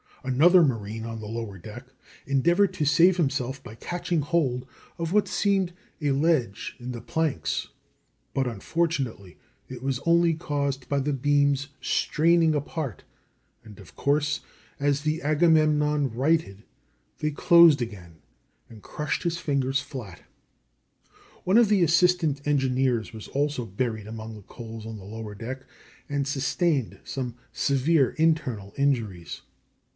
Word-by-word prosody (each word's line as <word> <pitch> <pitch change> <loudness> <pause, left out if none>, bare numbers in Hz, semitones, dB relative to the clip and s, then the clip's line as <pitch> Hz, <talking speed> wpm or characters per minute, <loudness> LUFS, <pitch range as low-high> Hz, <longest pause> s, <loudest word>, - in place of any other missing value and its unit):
Another 160 +8 +5
marine 115 -5 -2
on 115 -1 -5
the 105 - -7
lower 110 -3 -5
deck 110 +8 -10 0.4
endeavored 170 +9 +3
to 150 - 0
save 170 +5 +5
himself 135 -4 -1
by 115 - -10
catching 175 +6 -2
hold 135 -5 0 0.3
of 165 +1 -2
what 210 0 +3
seemed 195 -3 +1 0.3
a 145 -3 0
ledge 135 -7 0
in 125 +1 -6
the 120 -2 -6
planks, 135 - -1 0.6
but, 135 - +1
unfortunately, 125 - -2 0.3
it 130 -1 -9
was 135 -2 -1
only 170 0 +4
caused 140 -4 -2
by 140 - 0
the 145 +2 -1
beams 140 +1 +2
straining 165 0 +2
apart, 145 -3 -4 0.6
and, 110 -2 -13
of 95 - -15
course, 145 +1 +1 0.4
as 140 0 +1
the 155 +2 -1
Agamemnon 150 -2 +3
righted 130 -5 0 0.6
they 150 0 0
closed 165 -1 +6
again, 90 -9 -7 0.5
and 110 -2 -14
crushed 150 -1 -3
his 170 -1 -1
fingers 135 -3 0
flat. 115 -11 -9 1.2
One 190 +4 +3
of 235 -2 +6
the 200 -4 +4
assistant 165 -3 +2
engineers 130 -5 +1
was 110 -1 -9
also 145 -3 -1
buried 110 +1 -3
among 110 0 -7
the 105 - -11
coals 115 +1 -9
on 110 -1 -6
the 100 - -11
lower 105 +1 -7
deck, 130 +5 -6 0.5
and 140 -1 -1
sustained 140 - 0
some 125 -3 -4 0.2
severe 140 0 +2
internal 130 -11 0
injuries. 115 -11 -1
140 Hz, 135 wpm, -26 LUFS, 115-155 Hz, 1.2 s, closed